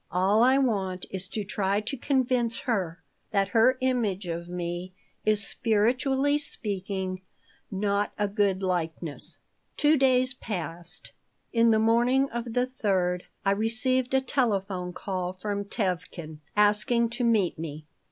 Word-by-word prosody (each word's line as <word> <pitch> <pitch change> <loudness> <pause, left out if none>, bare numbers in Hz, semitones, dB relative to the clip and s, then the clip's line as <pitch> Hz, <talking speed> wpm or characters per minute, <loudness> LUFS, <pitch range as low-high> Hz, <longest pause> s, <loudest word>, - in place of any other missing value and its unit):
All 195 +4 +3
I 260 +2 +6
want 195 -8 0
is 190 -1 -3
to 210 +2 -3
try 195 0 0
to 215 +6 -3
convince 250 -3 0
her 190 - -2 0.3
that 195 -2 +1
her 245 +4 +4
image 225 -7 0
of 170 0 -4
me 175 +1 -4 0.3
is, 210 -2 +3
spiritually 260 +7 +2
speaking, 190 -7 -3 0.5
not 200 +1 0
a 205 - +1
good 200 -2 +1
likeness." 165 -4 -2 0.4
Two 305 +1 +4
days 255 -1 +3
passed. 175 -7 -4 0.4
In 230 0 +5
the 220 - +5
morning 240 +5 +3
of 235 0 -4
the 245 +1 +2
third 190 -8 0 0.2
I 195 - +4
received 245 +5 +1
a 265 - +4
telephone 195 -9 0
call 185 -1 -3
from 200 +1 -3
Tevkin, 180 -6 -3 0.2
asking 210 +3 +3
to 245 +1 -2
meet 215 -8 +2
me. 155 -1 -6
205 Hz, 135 wpm, -27 LUFS, 185-245 Hz, 0.5 s, I